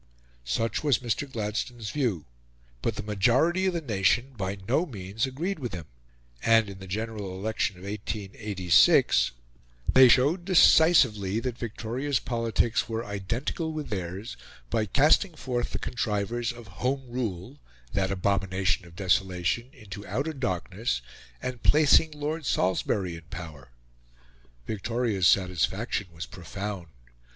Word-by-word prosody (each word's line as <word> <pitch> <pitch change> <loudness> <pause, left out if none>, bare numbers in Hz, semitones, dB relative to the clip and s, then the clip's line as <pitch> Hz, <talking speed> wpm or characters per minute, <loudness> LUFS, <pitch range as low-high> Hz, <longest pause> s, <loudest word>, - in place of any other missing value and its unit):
Such 115 - -1
was 145 -6 +4
Mr. 130 +3 -3
Gladstone's 110 +1 -3
view,; 115 - -1 0.6
but 115 - -1
the 105 - -5
majority 125 - +2
of 185 - +1
the 170 - -1
nation 120 +2 +1
by 100 -2 -3
no 135 +7 +3
means 105 - -3
agreed 160 +8 -3
with 125 -4 -5
him; 85 -3 -7 0.6
and, 115 -3 +4
in 95 - -11
the 95 - -9
General 105 -1 -4
Election 105 -1 -1
of 90 - -13
1886, 100 - +2 0.6
they 130 0 +9
showed 145 +9 +4
decisively 135 - +5
that 125 -1 -3
Victoria's 120 +4 -2
politics 115 -1 0
were 115 +1 -3
identical 115 - -3
with 155 -1 -5
theirs 95 +2 -5 0.4
by 110 -1 +1
casting 155 - +3
forth 125 -4 -2
the - - -3
contrivers 115 +1 -2
of 120 -1 -11 0.2
Home 135 +2 0
Rule 120 +1 -4 0.3
that 95 -1 +1
abomination 95 -1 0
of 85 - -16
desolation 95 +4 0
into 105 -7 -10
outer 150 +5 -2
darkness, 95 - -2 0.4
and 125 -2 -4
placing 155 +1 +5
Lord 150 0 -4
Salisbury 95 -1 0
in 85 - -13
power. 80 -8 -9 1.0
Victoria's 110 - 0
satisfaction 95 +3 +1
was 80 0 -6
profound. 100 0 -6
110 Hz, 130 wpm, -27 LUFS, 95-130 Hz, 1.0 s, they